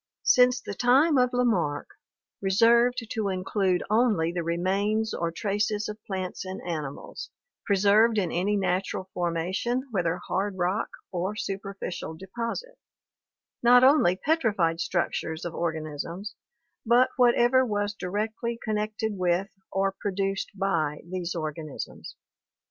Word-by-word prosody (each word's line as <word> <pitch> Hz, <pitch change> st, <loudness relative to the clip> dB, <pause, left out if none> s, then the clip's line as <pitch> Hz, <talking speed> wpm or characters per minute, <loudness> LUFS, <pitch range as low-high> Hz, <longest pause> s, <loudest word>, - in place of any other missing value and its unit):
Since 250 Hz, 0 st, +5 dB
the 205 Hz, -, -6 dB
time 265 Hz, -, +4 dB
of 250 Hz, 0 st, +4 dB
Lamarck 210 Hz, -, 0 dB, 0.5 s
reserved 235 Hz, +5 st, +4 dB
to 215 Hz, -3 st, -1 dB
include 185 Hz, -1 st, 0 dB
only 210 Hz, -7 st, +2 dB
the 175 Hz, 0 st, -2 dB
remains 195 Hz, +6 st, 0 dB
or 170 Hz, -1 st, -1 dB
traces 205 Hz, +2 st, -1 dB
of 210 Hz, 0 st, -8 dB
plants 185 Hz, -2 st, -4 dB
and 190 Hz, 0 st, -6 dB
animals, 155 Hz, -5 st, -5 dB, 0.4 s
preserved 210 Hz, +3 st, +4 dB
in 185 Hz, -5 st, +1 dB
any 195 Hz, +4 st, +1 dB
natural 185 Hz, 0 st, -1 dB
formation 180 Hz, +9 st, -1 dB
whether 175 Hz, -4 st, 0 dB
hard 190 Hz, +2 st, -2 dB
rock 185 Hz, +5 st, 0 dB, 0.2 s
or 185 Hz, +3 st, -2 dB
superficial 195 Hz, -5 st, -5 dB
deposit, 230 Hz, -, -5 dB, 0.8 s
not 245 Hz, +1 st, +7 dB
only 260 Hz, -, +5 dB
petrified 205 Hz, -, +1 dB
structures 170 Hz, -2 st, -2 dB
of 170 Hz, -, -4 dB
organisms 165 Hz, +4 st, -4 dB, 0.5 s
but 245 Hz, +2 st, +4 dB
whatever 245 Hz, +1 st, +5 dB
was 205 Hz, -3 st, -1 dB
directly 220 Hz, +4 st, -3 dB
connected 215 Hz, 0 st, -2 dB
with 180 Hz, +1 st, 0 dB, 0.2 s
or 195 Hz, 0 st, +1 dB
produced 195 Hz, 0 st, -2 dB
by 165 Hz, -6 st, 0 dB
these 180 Hz, -1 st, -4 dB
organisms." 155 Hz, -2 st, -6 dB
195 Hz, 120 wpm, -27 LUFS, 175-225 Hz, 0.8 s, not